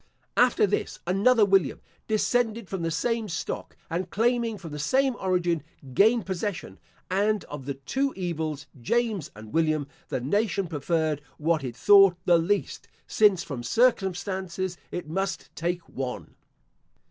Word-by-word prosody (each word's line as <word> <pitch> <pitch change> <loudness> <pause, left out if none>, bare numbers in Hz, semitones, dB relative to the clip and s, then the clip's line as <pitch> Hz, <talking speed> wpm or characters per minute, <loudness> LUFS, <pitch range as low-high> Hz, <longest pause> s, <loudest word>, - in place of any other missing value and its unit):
After 245 -3 +4
this, 205 - -2
another 205 +5 +4
William, 195 -7 +2 0.3
descended 225 0 +1
from 190 -1 -4
the 165 - 0
same 220 +7 -1
stock, 165 - -5
and 175 +2 -3
claiming 230 +1 +1
from 170 -4 -9
the 150 - -6
same 260 - +2
origin, 175 -3 +1 0.3
gained 220 - +4
possession; 190 0 -4 0.3
and 205 +2 +1
of 145 -2 -8
the 140 - -2
two 265 - -1
evils, 160 -5 -3 0.2
James 220 - 0
and 110 0 -11
William, 155 -2 +2 0.2
the - - -2
nation 200 - 0
preferred 155 -1 -1 0.2
what 160 -1 +1
it 125 -3 -5
thought 195 +2 +6
the 175 -2 +5
least; 195 +5 -1 0.2
since, 205 -5 +3
from 140 -5 -5
circumstances, 190 - 0 0.2
it 175 -3 -5
must 195 +5 -3
take 175 +1 -2
one. 130 -2 -5
185 Hz, 140 wpm, -26 LUFS, 160-210 Hz, 0.3 s, thought